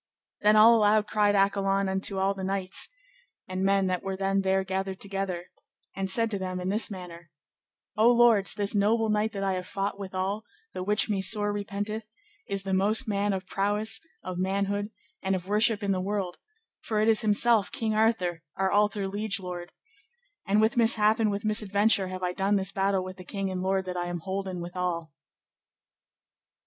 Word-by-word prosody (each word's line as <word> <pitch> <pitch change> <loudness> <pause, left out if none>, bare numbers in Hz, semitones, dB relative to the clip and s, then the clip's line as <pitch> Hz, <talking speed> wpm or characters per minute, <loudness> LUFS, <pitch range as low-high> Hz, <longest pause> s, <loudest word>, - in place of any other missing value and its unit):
Then 210 +1 +5
all 220 +2 +8
aloud 210 -1 +3
cried 210 -1 +2
Accolon 195 0 +2
unto 190 +1 -2
all 195 +1 +1
the 195 -1 -7
knights 190 0 -2 0.6
and 185 0 -3
men 195 0 +3
that 185 -1 -1
were 195 0 -4
then 195 0 +1
there 190 0 +1
gathered 190 0 -3
together, 195 -3 -4 0.5
and 195 0 -2
said 230 +3 +1
to 200 - -2
them 185 -1 -4
in 180 +1 -3
this 215 +4 +1
manner, 175 -4 -9 0.7
O 225 +3 +5
lords, 235 -5 +4
this 205 -1 0
noble 220 +2 +2
knight 215 +1 +1
that 195 -1 -3
I 195 -1 +1
have 185 -1 -4
fought 200 0 -3
withal, 195 +2 -3 0.3
the - - -5
which 205 +3 +1
me 205 -3 0
sore 205 +1 +2
repenteth, 205 +1 -4 0.4
is 195 -1 -2
the 195 -1 -3
most 215 +6 +3
man 205 0 0
of 190 -1 -3
prowess, 210 +3 0 0.2
of 185 -1 -5
manhood, 200 +2 -1 0.3
and 190 0 0
of 180 -1 -5
worship 210 +1 +2
in 200 - 0
the 185 -1 0
world, 195 -2 -3 0.4
for 215 -2 -2
it 215 - +2
is 220 -1 +4
himself 215 0 +3
King 220 -1 -2
Arthur, 215 -6 +1
our 190 0 0
alther 205 -1 +2
liege 205 +2 -2
lord, 180 -2 -7 0.8
and 200 +2 +3
with 220 +2 +2
mishap 220 -1 +4
and 220 -2 +2
with 205 +1 -3
misadventure 210 -1 +2
have 185 0 -6
I 180 0 -1
done 195 +2 +1
this 190 -1 0
battle 195 -1 0
with 185 0 -8
the 185 - -10
king 195 +1 -4
and 185 -1 -3
lord 190 0 0
that 180 -1 -4
I 175 0 -2
am 175 -1 -4
holden 190 -1 -4
withal. 175 -3 -4
195 Hz, 190 wpm, -27 LUFS, 190-210 Hz, 0.8 s, all